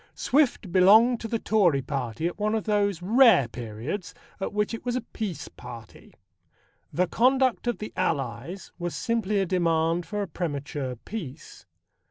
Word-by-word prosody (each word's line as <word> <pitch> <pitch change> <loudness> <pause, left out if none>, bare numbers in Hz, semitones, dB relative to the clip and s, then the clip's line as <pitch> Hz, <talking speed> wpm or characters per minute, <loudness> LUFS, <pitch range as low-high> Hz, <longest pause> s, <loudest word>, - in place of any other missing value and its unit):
Swift 260 - +1
belonged 220 +7 +6
to 225 - -5
the 230 - -1
Tory 180 -12 +2
Party 135 0 -3
at 175 +4 -3
one 215 +1 +1
of 220 - -1
those 205 -4 0
rare 220 - +6
periods 120 - -6 0.2
at 195 - -3
which 210 +2 -1
it 230 - -6
was 245 -1 -2
a 255 - 0
peace 205 -7 -5
party. 120 -3 -12 0.8
The 180 - +1
Conduct 255 +4 +2
of 240 - 0
the 215 - -7
Allies 135 - -3
was 175 -1 -3
simply 225 -3 -1
a 195 - +1
demand 165 -1 +1
for 210 -1 -2
a - - -5
premature 145 -6 -4
peace. 155 - -9
185 Hz, 160 wpm, -26 LUFS, 150-220 Hz, 0.8 s, belonged